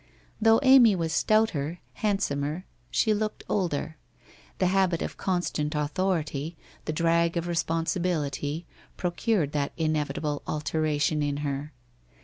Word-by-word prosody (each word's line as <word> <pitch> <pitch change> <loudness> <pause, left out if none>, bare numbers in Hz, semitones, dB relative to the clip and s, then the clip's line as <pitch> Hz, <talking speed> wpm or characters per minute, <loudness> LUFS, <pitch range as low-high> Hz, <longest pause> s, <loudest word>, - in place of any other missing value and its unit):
Though 225 0 +6
Amy 260 -6 +7
was 165 -3 -1
stouter, 175 -6 +2 0.2
handsomer, 175 -5 -1 0.2
she 220 - +2
looked 215 0 -2
older. 160 -5 -1 0.6
The 185 - +1
habit 185 -2 +2
of - - -5
constant 175 -5 -1
authority, 155 0 -1 0.3
the - - -1
drag 170 +1 +2
of 170 - -1
responsibility, 165 -2 -1 0.3
procured 180 -3 0
that 145 -2 -1
inevitable 155 -2 -1
alteration 150 -1 0
in 145 -1 -1
her. 140 +1 -3
165 Hz, 115 wpm, -27 LUFS, 150-185 Hz, 0.6 s, Amy